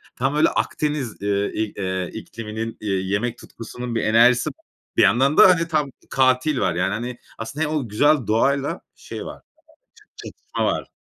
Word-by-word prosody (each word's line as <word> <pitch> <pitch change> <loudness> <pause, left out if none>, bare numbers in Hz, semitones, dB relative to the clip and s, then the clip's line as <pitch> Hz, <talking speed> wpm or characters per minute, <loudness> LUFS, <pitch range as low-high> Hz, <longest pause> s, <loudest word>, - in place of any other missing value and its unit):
Tam 135 +3 -1
böyle 150 - +4
Akdeniz, 145 -9 -2
eee, 100 0 0
i 110 -1 -2
eee, 95 -2 -2
ikliminin, 110 0 -6
eee, 105 - -4
yemek 100 +6 -1
tutkusunun 120 +1 -7
bir 115 - 0
enerjisi, 120 +2 +4 0.5
bir - - +6
yandan 135 +7 +3
da - - +9
hani 165 -2 +3
tam 150 -4 0 0.2
katil 130 +2 +2
var. 90 -6 0
Yani, 95 +3 0
hani, 120 +3 -4 0.2
aslında 125 +8 -3
hem 155 +1 -2
o 135 -7 -2
güzel 145 +3 +3
doğayla 140 - +1
şey - - -8
var. - - -9 0.6
Çat 420 - -25 0.3
çatışma - - -4
var. - - -1
120 Hz, 170 wpm, -22 LUFS, 105-140 Hz, 0.6 s, da